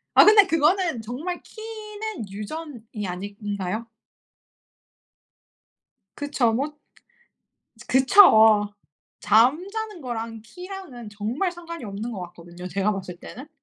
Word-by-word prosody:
아 - - +9
근데 420 -2 +8
그거는 330 - +2
정말 285 +11 -5
키는 435 - -7
유전이 220 -1 -7
아닌가요? 200 +3 -4 2.3
그쵸 285 -5 +1
뭐 285 +6 -2 1.1
그쵸. 220 - +6 0.5
잠자는 360 - +2
거랑 230 -4 -5
키랑은 360 - -9
정말 225 - -2
상관이 335 -4 -8
없는 210 +3 -5
것 200 - -6
같거든요 175 +1 -11
제가 195 +4 0
봤을 185 -3 -6
때는. 255 +10 -10
240 Hz, 210 characters per minute, -24 LUFS, 210-350 Hz, 2.3 s, 아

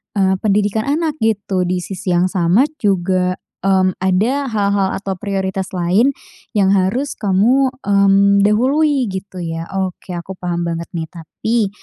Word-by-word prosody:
eee, 190 -1 +2
pendidikan 210 +2 0
anak 310 +1 -1
gitu. 200 -4 0
Di 180 -1 -1
sisi 185 -2 -3
yang 175 +1 +3
sama 185 +8 +3 0.2
juga, 185 -2 +1 0.3
mmm, 190 -1 +2
ada 225 +10 +1
hal-hal 200 -3 +1
atau 195 -1 -4
prioritas 190 -2 -2
lain 185 +10 +3 0.5
yang 195 0 +4
harus 205 +9 0
kamu, 230 +7 +3 0.2
mmm, 200 0 +4
dahului 265 +6 +2
gitu 190 0 -7
ya. 165 0 -5 0.2
Oke, 180 0 -7
aku 180 +3 -6
paham 175 -1 -2
banget 170 0 -4
nih. 160 - -2
Tapi 205 +6 -2
195 Hz, 140 wpm, -18 LUFS, 185-215 Hz, 0.5 s, yang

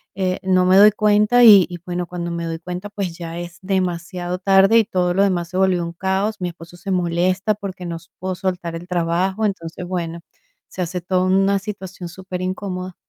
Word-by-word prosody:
eh, 185 -1 -1
no 185 -1 +3
me 185 +1 +5
doy 210 +2 +8
cuenta, 210 +3 +3
y 205 -6 +9
y 175 -1 -8
bueno, 180 0 -3
cuando 175 0 -5
me 170 0 -3
doy 165 0 -4
cuenta, 180 +4 -6
pues, 195 -5 -4
ya 170 -1 -6
es 175 0 -8
demasiado 180 -1 -2
tarde, 195 +3 +5
y 225 - +4
todo 180 -4 0
lo 195 - +4
demás 175 -4 0
se 180 - -4
volvió 190 -2 +2
un 170 0 -5
caos. 190 +4 -1
Mi 180 - -1
esposo 170 +1 -13
se 195 +3 -5
molesta, 185 +3 +1
porque 190 -3 -7
no 170 - -4
s 165 0 -11
puedo 185 +1 -3
soltar 180 -2 -3
el 170 +2 -8
trabajo. 180 +4 0
Entonces, 180 -4 -4
bueno, 170 -2 -4 0.5
se 185 - -6
hace 180 +1 -2
toda 180 +1 0
una 195 +1 +3
situación 190 -3 -7
superincomoda. 185 0 -5
185 Hz, 200 wpm, -20 LUFS, 175-195 Hz, 0.5 s, y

